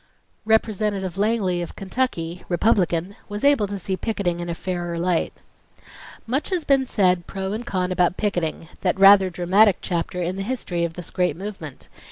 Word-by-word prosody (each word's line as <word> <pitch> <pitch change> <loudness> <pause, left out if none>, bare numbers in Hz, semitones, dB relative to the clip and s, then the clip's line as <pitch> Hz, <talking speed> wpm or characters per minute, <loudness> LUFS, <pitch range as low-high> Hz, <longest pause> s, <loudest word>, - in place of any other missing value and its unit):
Representative 210 -4 +1
Langley 200 -4 0
of 175 - -6
Kentucky, 190 -5 -2
Republican, 180 -1 +1
was 205 0 -5
able 280 -7 +4
to 200 0 -4
see 190 0 -3
picketing 185 -5 -2
in 175 0 -4
a 170 - -2
fairer 175 -1 -4
light: 175 0 0 0.9
"Much 260 +6 -1
has 360 -5 -1
been 270 -2 +3
said 180 -6 +2
pro 195 0 -4
and 230 +3 -5
con 185 -1 -1
about 180 0 +1
'picketing', 175 -6 -2
that 185 0 0
rather 195 -1 +8
dramatic 185 +4 +4
chapter 175 0 -3
in 180 +2 -2
the - - -3
history 195 -6 -2
of 170 -1 -2
this 175 -1 -7
great 180 -4 0
movement. 185 -8 -7
190 Hz, 170 wpm, -23 LUFS, 175-210 Hz, 0.9 s, rather